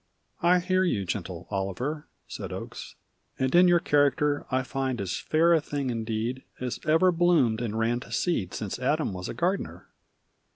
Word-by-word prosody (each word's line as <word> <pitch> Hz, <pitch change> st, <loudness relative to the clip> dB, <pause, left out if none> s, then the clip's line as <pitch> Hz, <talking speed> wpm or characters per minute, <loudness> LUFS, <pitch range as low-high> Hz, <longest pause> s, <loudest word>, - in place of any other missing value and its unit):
"I 175 Hz, +2 st, +5 dB
hear 185 Hz, +1 st, +1 dB
you, 105 Hz, -, 0 dB
gentle -, -, -5 dB
Oliver," 100 Hz, -, -3 dB, 0.2 s
Said -, -, -6 dB
Oakes, -, -, -7 dB, 0.4 s
"and 130 Hz, 0 st, 0 dB
in 180 Hz, +1 st, +7 dB
your 175 Hz, -1 st, +5 dB
character 145 Hz, -1 st, +2 dB
I 130 Hz, 0 st, +1 dB
find 130 Hz, -1 st, -2 dB
as 95 Hz, -2 st, -2 dB
fair 165 Hz, +2 st, +3 dB
a 160 Hz, -, +4 dB
thing 140 Hz, -3 st, -3 dB
indeed 115 Hz, +2 st, -2 dB, 0.2 s
As 125 Hz, -1 st, -3 dB
ever 165 Hz, +4 st, +5 dB
bloomed 165 Hz, -10 st, +3 dB
and 110 Hz, -2 st, -3 dB
ran 115 Hz, +2 st, +1 dB
to -, -, -12 dB
seed 105 Hz, -, -1 dB
Since 105 Hz, +2 st, -4 dB
Adam 140 Hz, -2 st, 0 dB
was 90 Hz, -1 st, -5 dB
a -, -, -5 dB
gardener. 185 Hz, +4 st, -2 dB
135 Hz, 170 wpm, -27 LUFS, 115-165 Hz, 0.4 s, in